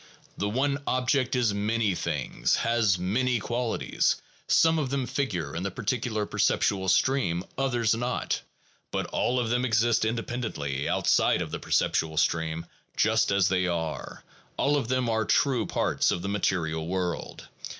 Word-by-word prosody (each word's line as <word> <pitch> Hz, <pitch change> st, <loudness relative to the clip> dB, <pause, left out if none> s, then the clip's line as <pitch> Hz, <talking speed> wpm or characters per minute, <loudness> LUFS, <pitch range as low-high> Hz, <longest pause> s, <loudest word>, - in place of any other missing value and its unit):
The 100 Hz, -, -2 dB
one 140 Hz, +5 st, 0 dB
object 130 Hz, +1 st, +1 dB
is 120 Hz, -4 st, +2 dB
many 105 Hz, 0 st, 0 dB
things, -, -, -1 dB
has 115 Hz, -5 st, +2 dB
many 120 Hz, +8 st, +1 dB
qualities; 120 Hz, +2 st, 0 dB, 0.3 s
some 160 Hz, 0 st, +4 dB
of 140 Hz, -4 st, -1 dB
them 135 Hz, -1 st, -1 dB
figure 90 Hz, -, -2 dB
in 85 Hz, -, -2 dB
the 100 Hz, -, -2 dB
particular 110 Hz, +1 st, -2 dB
per -, -, -7 dB
ceptual 95 Hz, -2 st, +2 dB
stream, 90 Hz, -8 st, +2 dB
others 120 Hz, -4 st, +1 dB
not; 120 Hz, +2 st, -2 dB, 0.5 s
but -, -, -2 dB
all 125 Hz, +1 st, +1 dB
of 120 Hz, -2 st, -1 dB
them 125 Hz, +1 st, +1 dB
exist 115 Hz, -1 st, +2 dB
independently, 110 Hz, -, -2 dB
outside -, -, +3 dB
of -, -, -8 dB
the -, -, -4 dB
perceptual 80 Hz, -1 st, 0 dB
stream, 80 Hz, 0 st, 0 dB, 0.3 s
just -, -, +3 dB
as 100 Hz, -2 st, +3 dB
they 90 Hz, -1 st, +1 dB
are; 80 Hz, -2 st, -4 dB, 0.3 s
all 145 Hz, +1 st, +2 dB
of 135 Hz, -6 st, -1 dB
them 130 Hz, 0 st, 0 dB
are 110 Hz, -1 st, +1 dB
true 125 Hz, +2 st, +2 dB
parts -, -, +1 dB
of 85 Hz, -, -1 dB
the 100 Hz, -, -2 dB
material 80 Hz, -5 st, -1 dB
world. 90 Hz, -1 st, -3 dB
110 Hz, 155 wpm, -27 LUFS, 90-125 Hz, 0.5 s, some